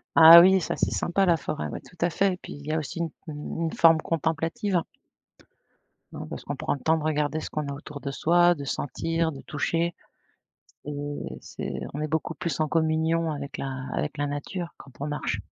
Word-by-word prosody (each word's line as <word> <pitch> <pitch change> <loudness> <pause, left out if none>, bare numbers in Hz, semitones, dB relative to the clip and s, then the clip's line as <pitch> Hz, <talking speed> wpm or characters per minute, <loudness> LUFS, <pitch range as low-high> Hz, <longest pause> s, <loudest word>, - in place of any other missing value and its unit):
Ah 165 +1 +11
oui 190 +2 +6
ça - - -2
c'est - - +1
sympa 195 +3 +1
la 170 -1 +4
forêt, 155 +1 -4
ouais, - - -6
tout 175 - -18
à 175 - +3
fait 195 +3 +2
et - - -6
puis - - -10
il 145 0 -11
y 155 - -3
a 160 - +1
aussi 150 - -6
une 165 -1 -1 0.2
une 150 +2 -5
une 160 - -1
forme 165 -1 +6
contemplative. 165 +4 0 1.3
Non, - - -7
parce - - -7
qu'on - - -4
prend - - -1
le 140 - -5
temps 160 +3 +2
de 155 - -4
regarder 150 0 0
ce - - -6
qu'on 150 -2 -3
a 140 - -3
autour 145 0 -9
de 140 - -4
soi, 175 +4 +4
de 145 - -7
sentir 165 +4 -1
de 135 - -9
toucher 165 +3 -1 0.9
et 145 0 -4 0.2
c'est - - -6
on 150 - -4
est 155 - -1
beaucoup 160 +2 -2
plus 170 -3 -3
en 155 - +2
communion 160 +1 +1
avec 140 -1 -6
la 135 -1 -4
avec 150 0 -2
la 145 0 0
nature 170 +5 -5
quand 135 - -14
on 145 - -3
marche. 145 -8 -2
160 Hz, 215 wpm, -26 LUFS, 145-170 Hz, 1.3 s, Ah